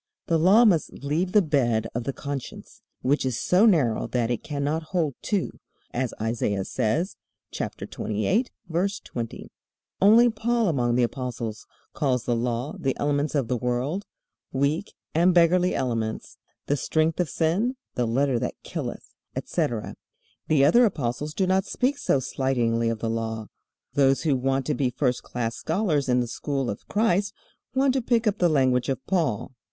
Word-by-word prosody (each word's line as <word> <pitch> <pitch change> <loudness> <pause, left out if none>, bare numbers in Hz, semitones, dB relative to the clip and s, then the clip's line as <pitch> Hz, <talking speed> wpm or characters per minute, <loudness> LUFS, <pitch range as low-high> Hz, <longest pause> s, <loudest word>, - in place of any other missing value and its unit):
The 165 -1 +2
Law 200 +8 +6
must 175 -8 +3
leave 160 +6 0
the 210 0 +5
bed 120 -8 +1
of 120 0 -3
the 135 - -1
conscience, 140 -1 -7 0.2
which 140 +3 +2
is 130 -3 -1
so 190 +5 +4
narrow 140 - +2
that 120 -1 0
it 120 - -1
cannot 145 +2 -1 0.2
hold 155 -5 +1
two, 205 -4 -2 0.3
as 125 -2 -1
Isaiah 110 -3 -1
says, 130 - -1 0.3
chapter - - -4
28, 110 - -1 0.2
verse 185 +5 -1
20. 115 -2 -7 0.5
Only 225 +5 +7
Paul 230 -1 +1
among 120 -6 +1
the 125 - +3
apostles 120 -3 -4 0.3
calls 130 -5 0
the 120 - 0
Law 120 +3 -2
"the 135 -1 -1
elements 145 +1 0
of 135 -5 +1
the 125 - 0
world, 125 - -2 0.5
weak 145 +8 0 0.2
and 175 +3 +4
beggarly 180 +1 +4
elements, 115 -4 -3 0.3
the 145 - +1
strength 155 +4 0
of 175 -4 +1
sin, 190 +11 +1 0.2
the 120 -1 0
letter 130 +1 +1
that 125 - -3
killeth," - - -6 0.2
etc. 115 -3 -2 0.5
The 140 -3 +4
other 235 +12 +6
apostles 150 - -1
do 190 - +2
not 190 +1 +2
speak 265 +6 0
so 140 - +2
slightingly 120 -3 0
of 115 - -1
the 115 - -1
Law. 110 -1 -3 0.4
Those 135 0 +3
who 150 -4 +2
want 135 +1 0
to - - 0
be 130 0 +1
first 125 0 0
class 115 -1 -3
scholars 160 -6 0
in 125 0 +3
the 120 - -2
school 135 +1 -2
of 100 - -9
Christ 205 -2 +1 0.4
want 265 0 +3
to 265 - +1
pick 235 -1 +1
up 210 -1 +1
the 175 - +4
language 130 -4 +2
of 135 - 0
Paul. 150 - -1
140 Hz, 170 wpm, -25 LUFS, 120-180 Hz, 0.5 s, Only